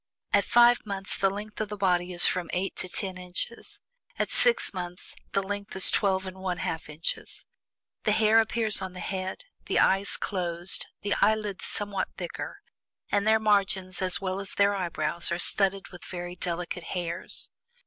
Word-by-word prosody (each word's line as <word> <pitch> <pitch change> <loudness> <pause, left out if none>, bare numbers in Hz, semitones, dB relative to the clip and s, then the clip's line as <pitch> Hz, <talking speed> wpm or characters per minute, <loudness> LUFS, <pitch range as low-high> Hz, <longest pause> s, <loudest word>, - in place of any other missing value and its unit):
At 200 - +4
FIVE 240 0 +5
MONTHS 195 -2 -4
the 195 - +3
length 210 +2 -6
of 215 - -2
the 210 - -5
body 180 -2 +1
is 175 -1 +3
from 180 -2 +1
eight 185 +2 -1
to 185 - 0
ten 185 0 -1
inches. 180 +6 -5 0.4
At - - 0
SIX 475 - +4
MONTHS, 180 -1 -6 0.2
the 195 - +2
length 205 +1 -5
is 190 - +8
twelve 190 -2 +1
and 190 0 -8
one 185 -2 -2
half 160 -2 -4
inches. 150 +2 -5 0.6
The 215 - +4
hair 220 +1 +5
appears 220 -2 +1
on 190 -1 -5
the 180 - -8
head, 190 - -4 0.2
the - - +1
eyes 195 +1 +3
closed, 175 -1 -1 0.2
the 205 - +1
eyelids 210 -2 +2
somewhat 205 -3 -1
thicker, 175 -3 -6 0.5
and 205 +1 +2
their 220 0 +5
margins, 195 -3 +1
as 185 -1 +2
well 190 0 -2
as 195 -1 -2
their 200 0 +4
eyebrows, 175 -2 -1
are 170 - 0
studded 195 +2 +1
with 180 - -12
very 175 0 -6
delicate 175 0 -4
hairs. 170 -1 -5
190 Hz, 175 wpm, -27 LUFS, 180-205 Hz, 0.6 s, is